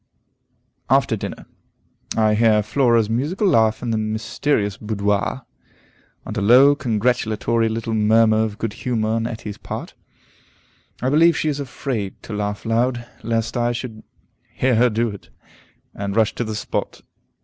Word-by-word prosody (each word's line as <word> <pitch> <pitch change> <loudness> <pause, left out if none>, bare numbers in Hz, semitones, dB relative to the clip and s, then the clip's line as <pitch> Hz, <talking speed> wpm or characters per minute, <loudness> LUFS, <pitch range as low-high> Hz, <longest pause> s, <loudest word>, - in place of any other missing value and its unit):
After - - +3
Dinner. - - -7 0.7
I 110 -1 +3
hear 105 -1 +3
Flora's 115 -1 +2
musical 145 - -1
laugh 110 - +3
in 120 - -1
the 110 - 0
mysterious 110 0 -1
boudoir, 105 +4 -1 0.8
and 110 - -6
a 105 - -1
low, 125 +7 +7
congratulatory 115 -2 0
little 115 0 -3
murmur 110 +1 +4
of 105 -2 -4
good 115 -2 -3
humor 115 -2 -2
on 115 +1 0
Etty's 110 -3 -7
part. - - -7 1.1
I 130 - +1
believe 165 +2 +5
she 155 - 0
is 145 -1 -2
afraid 120 -6 -4
to - - -7
laugh 105 0 -3
loud, 120 +1 0 0.2
lest 115 +1 -2
I 120 0 +1
should 115 -2 -6 0.5
hear 130 0 +1
her 120 +2 +4
do 115 +1 0
it, 100 -2 -10 0.6
and 100 0 -4
rush 110 -2 +2
to - - -3
the 110 -1 -4
spot. - - -4
115 Hz, 150 wpm, -21 LUFS, 110-125 Hz, 1.1 s, low